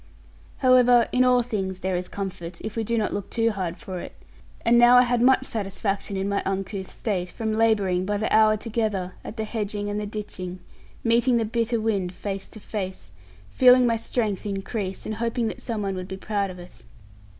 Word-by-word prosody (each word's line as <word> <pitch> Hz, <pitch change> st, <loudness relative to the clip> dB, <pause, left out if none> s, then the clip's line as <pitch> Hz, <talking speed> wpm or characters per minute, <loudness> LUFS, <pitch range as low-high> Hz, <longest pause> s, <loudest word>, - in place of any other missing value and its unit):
However, 250 Hz, -2 st, +5 dB
in 250 Hz, -, +3 dB
all 250 Hz, -1 st, +4 dB
things 190 Hz, -5 st, -3 dB
there 190 Hz, 0 st, -1 dB
is 180 Hz, +1 st, -2 dB
comfort, 180 Hz, -3 st, -6 dB
if 215 Hz, -, -6 dB
we 225 Hz, -, -1 dB
do 230 Hz, +2 st, -1 dB
not 215 Hz, -, 0 dB
look 205 Hz, -, -4 dB
too 230 Hz, 0 st, +1 dB
hard 185 Hz, -4 st, -3 dB
for 190 Hz, -6 st, -6 dB
it; -, -, -8 dB, 0.5 s
and 235 Hz, +1 st, +5 dB
now 240 Hz, +1 st, +8 dB
I 250 Hz, -, +8 dB
had 245 Hz, -1 st, +1 dB
much 260 Hz, +1 st, +4 dB
satisfaction, 200 Hz, -2 st, -2 dB
in 190 Hz, +1 st, -1 dB
my 200 Hz, 0 st, 0 dB
uncouth 195 Hz, 0 st, -3 dB
state, 185 Hz, -5 st, -3 dB
from 220 Hz, +3 st, -3 dB
labouring, 205 Hz, -5 st, +2 dB
by 205 Hz, +2 st, -1 dB
the 220 Hz, -, 0 dB
hour 215 Hz, 0 st, +5 dB
together, 210 Hz, -5 st, -2 dB
at 225 Hz, -, -8 dB
the 220 Hz, -, -1 dB
hedging 205 Hz, -2 st, -3 dB
and 205 Hz, -, -2 dB
the 210 Hz, -, -4 dB
ditching, 185 Hz, -4 st, -6 dB, 0.5 s
meeting 235 Hz, +2 st, +3 dB
the 225 Hz, -, +1 dB
bitter 230 Hz, +1 st, 0 dB
wind 200 Hz, -5 st, -1 dB
face 195 Hz, 0 st, -5 dB
to 215 Hz, -, -11 dB
face, 190 Hz, -, -6 dB, 0.4 s
feeling 250 Hz, 0 st, +6 dB
my 230 Hz, -1 st, +3 dB
strength 220 Hz, -3 st, -2 dB
increase, 195 Hz, -1 st, -4 dB
and 220 Hz, -, -3 dB
hoping 230 Hz, 0 st, -1 dB
that -, -, -8 dB
some 225 Hz, -4 st, -3 dB
one 195 Hz, -1 st, -1 dB
would 185 Hz, -1 st, -5 dB
be 190 Hz, 0 st, -6 dB
proud 200 Hz, 0 st, -1 dB
of 185 Hz, -, -8 dB
it. 175 Hz, 0 st, -13 dB
210 Hz, 205 wpm, -25 LUFS, 190-230 Hz, 0.5 s, now